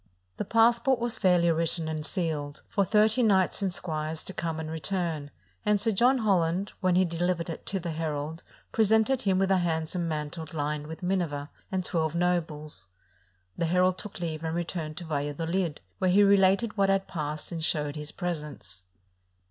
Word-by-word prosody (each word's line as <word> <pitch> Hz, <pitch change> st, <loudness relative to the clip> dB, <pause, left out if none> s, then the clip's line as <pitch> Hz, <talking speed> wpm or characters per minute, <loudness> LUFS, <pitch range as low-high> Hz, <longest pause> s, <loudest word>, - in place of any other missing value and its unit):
The -, -, -2 dB
passport 235 Hz, +4 st, +4 dB
was 235 Hz, -1 st, 0 dB
fairly 175 Hz, -3 st, +4 dB
written 165 Hz, 0 st, 0 dB
and 155 Hz, -1 st, -3 dB
sealed, 150 Hz, -4 st, -3 dB
for 200 Hz, -, +1 dB
thirty 215 Hz, +4 st, +3 dB
knights 195 Hz, -4 st, +3 dB
and 195 Hz, -2 st, 0 dB
squires 155 Hz, -3 st, -3 dB
to 190 Hz, -, -5 dB
come 165 Hz, -3 st, -3 dB
and 160 Hz, -, -4 dB
return; 160 Hz, -3 st, -2 dB, 0.3 s
and 210 Hz, -1 st, +3 dB
Sir 225 Hz, +2 st, +3 dB
John 245 Hz, +6 st, +4 dB
Holland, 190 Hz, -3 st, +1 dB
when 185 Hz, -2 st, +3 dB
he 185 Hz, +1 st, +5 dB
delivered 170 Hz, 0 st, -1 dB
it -, -, -9 dB
to 195 Hz, -, -1 dB
the 170 Hz, -1 st, -4 dB
herald, 155 Hz, 0 st, -3 dB, 0.3 s
presented 220 Hz, +4 st, +3 dB
him 195 Hz, -4 st, +2 dB
with 195 Hz, 0 st, +2 dB
a 190 Hz, -, +4 dB
handsome 170 Hz, 0 st, -1 dB
mantle 155 Hz, +1 st, -4 dB
lined 150 Hz, -1 st, -2 dB
with 160 Hz, +3 st, -8 dB
a -, -, -1 dB
minever, 160 Hz, -6 st, -1 dB, 0.2 s
and 185 Hz, -1 st, -1 dB
twelve 160 Hz, -2 st, 0 dB
nobles. 155 Hz, -, -1 dB, 0.7 s
The 170 Hz, -, 0 dB
herald 180 Hz, +2 st, +2 dB
took 205 Hz, -2 st, -7 dB
leave 160 Hz, -2 st, -3 dB
and 160 Hz, 0 st, -2 dB
returned 165 Hz, -3 st, -3 dB
to 175 Hz, -, -6 dB
Valladolid, 160 Hz, +3 st, -2 dB, 0.2 s
where 185 Hz, -, +2 dB
he 200 Hz, +3 st, +6 dB
related 200 Hz, +3 st, +4 dB
what 195 Hz, -1 st, +3 dB
had 195 Hz, 0 st, +2 dB
passed, 150 Hz, -1 st, -4 dB
and 165 Hz, -2 st, -4 dB
showed 150 Hz, -2 st, 0 dB
his 150 Hz, 0 st, -4 dB
presents. 150 Hz, -, -5 dB
170 Hz, 180 wpm, -28 LUFS, 155-195 Hz, 0.7 s, he